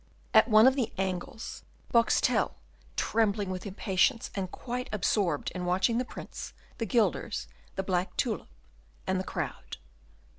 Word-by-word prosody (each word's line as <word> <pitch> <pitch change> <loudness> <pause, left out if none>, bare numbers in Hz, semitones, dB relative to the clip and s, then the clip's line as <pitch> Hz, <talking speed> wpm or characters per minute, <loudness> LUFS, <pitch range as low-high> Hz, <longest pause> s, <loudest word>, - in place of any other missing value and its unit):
At 220 0 +7
one 215 -1 +7
of 260 0 +6
the 255 -5 0
angles, 190 +3 -3 0.3
Boxtel, 230 -1 +3 0.4
trembling 205 -3 +1
with 185 +2 -4
impatience, 200 +5 +1
and 190 -2 -2
quite 250 +5 -4
absorbed 185 -6 +1
in 180 - -4
watching 190 +6 +2
the 255 - -1
Prince, - - -8 0.3
the 225 - -1
guilders, 230 0 +1 0.3
the 190 - -1
black 185 -1 -1
tulip, 230 -4 -1 0.6
and 190 0 +1
the - - -1
crowd. - - -5
205 Hz, 140 wpm, -29 LUFS, 185-230 Hz, 0.6 s, At